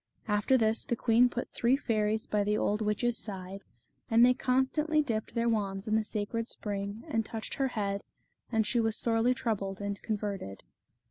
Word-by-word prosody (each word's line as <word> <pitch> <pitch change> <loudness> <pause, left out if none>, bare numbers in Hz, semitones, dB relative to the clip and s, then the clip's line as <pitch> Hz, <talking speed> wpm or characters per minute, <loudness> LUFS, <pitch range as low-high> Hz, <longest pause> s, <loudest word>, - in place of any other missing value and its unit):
After 210 +5 +3
this 220 -1 +2
the 235 - -1
queen 235 +1 +4
put 245 0 -4
three 245 +3 +2
fairies 215 -4 0
by 210 -1 +1
the 210 +1 +1
old 210 +1 0
witch's 220 +3 0
side, 195 -1 -6 0.5
and 230 +1 +6
they 250 - +5
constantly 270 +5 +1
dipped 225 -3 -3
their 235 0 +1
wands 200 -2 -1
in 215 - 0
the 220 0 +3
sacred 215 +2 -3
spring, 200 0 -4
and 225 0 0
touched 220 0 -5
her 270 - 0
head, 200 -5 -2 0.5
and 220 -2 +2
she 240 +3 +1
was 225 -1 +1
sorely 230 +2 +2
troubled 200 -6 -2
and 200 -1 -4
converted. 200 - -4
220 Hz, 180 wpm, -30 LUFS, 205-235 Hz, 0.5 s, and